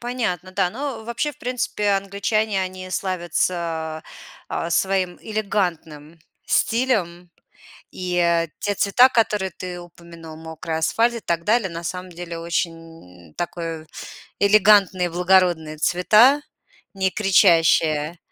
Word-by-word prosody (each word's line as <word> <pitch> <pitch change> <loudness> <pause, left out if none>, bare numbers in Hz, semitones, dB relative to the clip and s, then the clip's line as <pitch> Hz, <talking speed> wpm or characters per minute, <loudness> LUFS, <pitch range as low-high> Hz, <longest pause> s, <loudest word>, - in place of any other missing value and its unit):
Понятно, 220 -8 -3
да. 190 -2 +1
Но 250 -1 -5
вообще 235 +6 -2
в - - -23
принципе 240 -4 -2
англичане, 200 +1 0
они 185 0 -6
славятся, 170 -3 -2 0.5
а, 165 - -3
своим 185 0 0
элегантным 175 -7 -3 0.3
стилем. 190 -8 0 0.6
И 170 -2 0
те 205 0 -2
цвета, 225 +6 +5
которые 210 -5 0
ты 180 +1 -7
упомянул- 170 -2 -12
мокрый 160 0 -5
асфальт 230 +9 +1
и - - -4
так 170 -1 -2
далее, 220 -2 +2
на 170 0 -7
самом 180 +1 -5
деле 170 -1 -7
очень 165 - -6
такое 165 -2 -5 0.5
элегантные, 200 -3 +4
благородные 175 -3 +2
цвета, 215 - +4 0.5
не 190 -1 0
кричащие. 165 -5 +3
180 Hz, 110 wpm, -22 LUFS, 165-205 Hz, 0.6 s, цвета